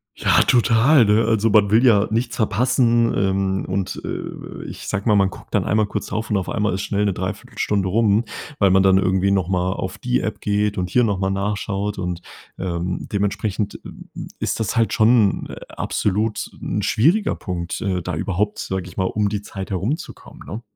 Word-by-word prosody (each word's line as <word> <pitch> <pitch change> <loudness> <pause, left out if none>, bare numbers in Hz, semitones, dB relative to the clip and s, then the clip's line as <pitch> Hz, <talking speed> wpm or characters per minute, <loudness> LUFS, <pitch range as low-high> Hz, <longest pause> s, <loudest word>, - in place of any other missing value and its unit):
Ja, - - +3
total, 120 +2 +4
ne? 105 +2 +3
Also, 110 0 +2
man 100 -1 +4
will 115 +4 +5
ja 105 -4 +5
nichts 115 +3 -1
verpassen, 120 +1 +2
ähm, 95 0 0
und, 95 0 -3
äh - - -6
äh, - - -7
ich - - -8
sage 105 +1 -2
mal, 105 - +4
man 100 -1 +3
guckt - - -14
dann - - +2
einmal 110 +1 +2
kurz - - -4
drauf 110 +1 -4
und 105 - +1
auf 95 -2 -1
einmal 105 -4 0
ist 95 - -2
schnell 105 0 -1
'ne 100 - +1
3/4 105 +6 -6
Stunde 100 -3 0
rum, 110 +2 +2 0.3
weil 100 -2 +4
man 95 +1 +5
dann 95 0 +5
irgendwie 95 0 +2
noch 95 -3 +1
mal 90 -1 0
auf 95 +1 -4
die 125 0 0
App 110 -1 -4
geht 105 0 0
und 90 -1 -2
hier 120 +5 +3
noch 100 -3 0
mal 95 0 -1
nachschaut. 100 +1 -2
Und, 90 -2 -3 0.4
ähm, 90 0 -3
dementsprechend, 100 0 -2
hm, - - -12 0.3
ist - - -2
das 110 -1 -1
halt 115 -3 +2
schon, 110 -2 +3
äh, - - -7
absolut 105 +2 -1
'n 105 - -2
schwieriger 155 - +2
Punkt, 85 -2 -4
äh, 95 -5 -1
da 90 -1 -4
überhaupt, 100 +5 -1
sage 95 -2 -3
ich - - -16
mal, 95 - +1
um 105 +1 0
die 105 -1 -3
Zeit 95 -1 -7
herumzukommen, 105 - -4
ne? 110 +4 -6
100 Hz, 200 wpm, -21 LUFS, 95-110 Hz, 0.4 s, will